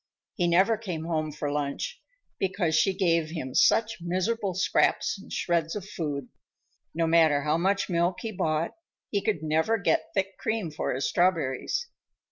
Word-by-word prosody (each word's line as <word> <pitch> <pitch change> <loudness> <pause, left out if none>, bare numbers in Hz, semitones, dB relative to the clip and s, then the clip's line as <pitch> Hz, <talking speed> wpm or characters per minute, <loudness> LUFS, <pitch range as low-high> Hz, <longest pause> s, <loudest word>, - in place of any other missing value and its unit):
He 175 -3 0
never 190 +6 +4
came 175 -8 -4
home 155 -2 -1
for 145 0 -3
lunch, 145 - -3 0.4
because 190 -4 0
she 195 - +4
gave 170 -4 +1
him 155 -6 -5
such 225 -2 +3
miserable 185 +3 -1
scraps 190 +1 +2
and - - -14
shreds 170 -1 0
of 200 -2 -5
food. 145 -9 -4 0.7
No 165 0 +1
matter 160 -3 +4
how 155 +2 +1
much 195 +3 +1
milk 175 0 0
he 225 - -4
bought, 160 -4 -1 0.4
he 200 - +1
could 200 -8 0
never 160 +8 +2
get 200 - +1
thick 195 0 -1
cream 220 -7 -2
for 150 - -2
his 130 +1 -1
strawberries. 175 - +1
170 Hz, 160 wpm, -27 LUFS, 155-195 Hz, 0.7 s, never